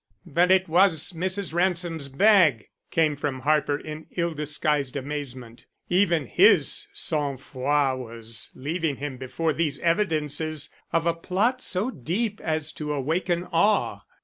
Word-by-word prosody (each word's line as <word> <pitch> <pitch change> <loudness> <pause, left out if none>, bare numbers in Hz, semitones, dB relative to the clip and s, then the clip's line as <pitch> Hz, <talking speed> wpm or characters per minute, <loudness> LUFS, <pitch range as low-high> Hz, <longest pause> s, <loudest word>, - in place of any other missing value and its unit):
"But 175 +2 +2
it 190 0 +4
was 170 -2 +3
Mrs. 185 +1 -2
Ransom's 170 -4 0
bag," 155 - +4 0.2
came 155 -2 +2
from 140 -2 -3
Harper 145 0 +2
in 155 +1 -8
ill 170 -1 0
disguised 150 -2 -1
amazement. 130 -4 -6 0.2
Even 175 -5 +2
his - - +4
sang 145 -3 -1
froid 135 0 0
was 115 -2 -4
leaving 155 +2 -2
him 140 -1 -6
before 155 +5 -2
these 155 -1 0
evidences 155 -4 0 0.2
of 165 0 +1
a 170 - +2
plot 205 +10 0
so 200 +5 -1
deep 200 - -2
as 155 -1 -1
to 150 -1 -5
awaken 165 +5 -1
awe. 205 +5 +2
155 Hz, 135 wpm, -25 LUFS, 140-175 Hz, 0.2 s, it